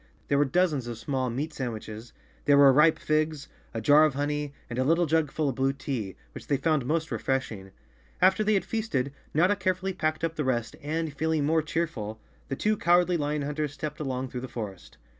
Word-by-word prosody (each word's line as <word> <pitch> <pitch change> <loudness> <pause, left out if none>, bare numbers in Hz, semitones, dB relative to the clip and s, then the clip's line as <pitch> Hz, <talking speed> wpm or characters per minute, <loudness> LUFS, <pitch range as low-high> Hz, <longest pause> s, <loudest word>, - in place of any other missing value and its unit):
There 140 - +3
were 145 - +4
dozens 150 -4 +1
of 120 -1 -5
small 130 +2 -2
meat 145 +7 -3
sandwiches, 115 -3 -6 0.3
there 145 -1 +5
were 140 -1 +8
ripe 150 +3 +5
figs, 155 -1 -1 0.2
a 115 - -4
jar 145 +7 +6
of 155 -3 +2
honey, 145 0 -1 0.2
and 120 +1 -4
a - - +3
little 165 +5 +3
jug 160 -1 +1
full 155 +1 -1
of - - -2
blue 135 +2 +1
tea, 125 -8 -4 0.2
which - - -10
they 140 - +2
found 140 -2 +1
most 160 +2 -1
refreshing. 115 -8 -2 0.5
After 190 +3 +4
they 215 0 +3
had 195 - 0
feasted, 140 - -2 0.2
Notta 180 +7 +3
carefully 190 0 -1
packed 155 -2 -1
up 165 0 -1
the 150 - 0
rest 120 -4 -1
and, 155 +1 -2
feeling 160 -1 0
more 160 +2 +3
cheerful, 155 -10 -3 0.3
the 135 - -3
two 215 +8 +1
cowardly 175 0 +3
lion 150 -2 -1
hunters 150 0 -2
stepped 150 0 -5
along 130 -3 -3
through 125 - -5
the 130 - -5
forest. 105 -7 -7
145 Hz, 205 wpm, -27 LUFS, 130-160 Hz, 0.5 s, were